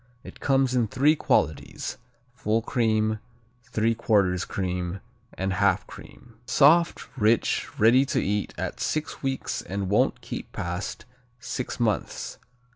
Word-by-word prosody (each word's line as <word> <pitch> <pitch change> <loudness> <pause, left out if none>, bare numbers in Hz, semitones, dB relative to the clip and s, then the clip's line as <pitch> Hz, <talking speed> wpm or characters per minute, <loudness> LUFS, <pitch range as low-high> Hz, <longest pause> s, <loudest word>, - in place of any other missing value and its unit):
It - - -11
comes 135 -2 +2
in 120 -3 +2
three 140 +7 +3
qualities: 80 - -1 0.3
full 115 -2 0
cream, 110 -3 +1 0.5
3/4 110 -4 +2
cream, 90 -1 -3 0.4
and 95 0 -1
half 95 -1 +2
cream. 120 -2 -14
Soft; 165 +2 +4
rich; 115 -2 +2
ready 120 +5 +6
to - - +1
eat 105 +1 -1
at - - -4
six 155 0 -2
weeks 135 -1 -2
and 95 0 -4
won't 105 - +2
keep - - -7
past 90 +5 -4 0.3
six 125 0 -4
months. 110 -5 -1
110 Hz, 120 wpm, -26 LUFS, 100-125 Hz, 0.5 s, ready